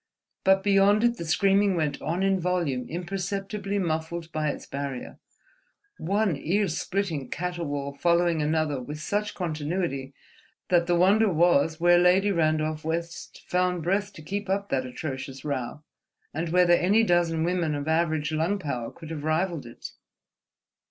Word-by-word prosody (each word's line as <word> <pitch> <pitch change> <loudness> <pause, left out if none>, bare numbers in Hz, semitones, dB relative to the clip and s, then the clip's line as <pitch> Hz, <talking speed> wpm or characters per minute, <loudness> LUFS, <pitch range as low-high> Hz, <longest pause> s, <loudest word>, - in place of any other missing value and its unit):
But 190 0 +4
beyond 200 +2 +4
it 240 0 +2
the 170 - -5
screaming 195 +4 +3
went 150 -4 -1
on 170 +4 -1
in 195 -1 +2
volume 170 -8 -1
imperceptibly 195 +3 -3
muffled 165 -1 -2
by 155 -1 -1
its - - -5
barrier, 140 -2 -6 0.8
one 200 0 +1
ear 195 +8 0
splitting 165 -3 -2
caterwaul 155 -6 -3
following 170 +1 +2
another 150 -2 0
with 150 +4 -7
such 205 +6 -2
continuity 155 -5 -3 0.5
that 175 -1 +3
the 175 - +3
wonder 200 +4 +4
was 160 -2 +3
where 175 +1 +5
Lady 185 +3 +4
Randolph 155 -2 0
West 165 +1 -5
found 180 -1 0
breath 200 +4 0
to 155 - -12
keep 200 +4 -4
up 200 +1 -1
that 130 -1 -1
atrocious 130 0 -6
row, 140 +1 -4 0.5
and 165 +2 -2
whether 180 0 +4
any 195 +6 +4
dozen 175 -4 +2
women 170 -3 0
of 145 +1 -4
average 160 -1 +1
lung 165 +6 0
power 130 -10 -4
could 165 -1 -11
have 150 -3 -5
rivalled 155 -3 -1
it. 120 - -9
170 Hz, 150 wpm, -26 LUFS, 155-190 Hz, 0.8 s, where